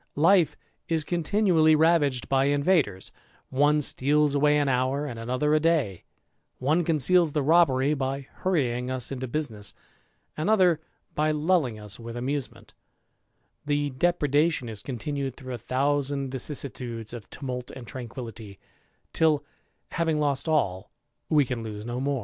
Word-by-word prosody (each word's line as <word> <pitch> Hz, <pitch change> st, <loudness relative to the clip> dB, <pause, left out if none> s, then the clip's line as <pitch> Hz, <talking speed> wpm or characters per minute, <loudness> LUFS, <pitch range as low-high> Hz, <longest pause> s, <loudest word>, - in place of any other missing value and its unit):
Life 170 Hz, +2 st, +4 dB, 0.3 s
is 160 Hz, -2 st, -1 dB
ontinually 170 Hz, -2 st, +3 dB
ravaged 150 Hz, -5 st, +2 dB
by 135 Hz, 0 st, +2 dB
invaders; 140 Hz, -, +1 dB, 0.4 s
one 145 Hz, +3 st, +3 dB
steals 145 Hz, +2 st, +2 dB
away 150 Hz, +1 st, +3 dB
an 145 Hz, -1 st, +1 dB
hour, 130 Hz, +2 st, +1 dB
nd 120 Hz, -4 st, -6 dB
another 130 Hz, +6 st, 0 dB
a 155 Hz, -, +4 dB
day; 155 Hz, -, 0 dB, 0.5 s
one 155 Hz, +7 st, +1 dB
conceals 165 Hz, +1 st, +3 dB
the 150 Hz, -, +1 dB
robbery 145 Hz, -3 st, +4 dB
by 135 Hz, -1 st, -2 dB, 0.2 s
hurrying 125 Hz, -9 st, 0 dB
s 130 Hz, -1 st, -4 dB
into 130 Hz, -1 st, -4 dB
business, 115 Hz, -7 st, -4 dB, 0.6 s
another 175 Hz, -1 st, +3 dB, 0.3 s
by 155 Hz, +1 st, +1 dB
lulling 150 Hz, -6 st, +1 dB
us 105 Hz, 0 st, -9 dB
with 115 Hz, 0 st, -7 dB
amusement; 135 Hz, +2 st, -4 dB, 0.9 s
[le 145 Hz, -1 st, 0 dB
depredation 150 Hz, -1 st, +1 dB
is 110 Hz, -3 st, -5 dB
continued 135 Hz, +2 st, -4 dB
through 130 Hz, -2 st, -7 dB
a 120 Hz, -, -5 dB
thousand 140 Hz, +2 st, -1 dB
vicissi 135 Hz, +1 st, -3 dB
iides 115 Hz, -3 st, -7 dB
of 120 Hz, -3 st, -9 dB
tumult 125 Hz, -2 st, -5 dB
and 125 Hz, -, -9 dB
tranquillity, 115 Hz, -4 st, -8 dB, 0.6 s
till, 150 Hz, -2 st, +2 dB, 0.5 s
having 165 Hz, -2 st, 0 dB
lost 145 Hz, 0 st, 0 dB
all, 95 Hz, -12 st, 0 dB, 0.4 s
we 150 Hz, -3 st, +4 dB
can 120 Hz, -2 st, -4 dB
>se 105 Hz, -1 st, -6 dB
no 120 Hz, +1 st, -3 dB
more. 140 Hz, 0 st, 0 dB
140 Hz, 140 wpm, -26 LUFS, 125-155 Hz, 0.9 s, Life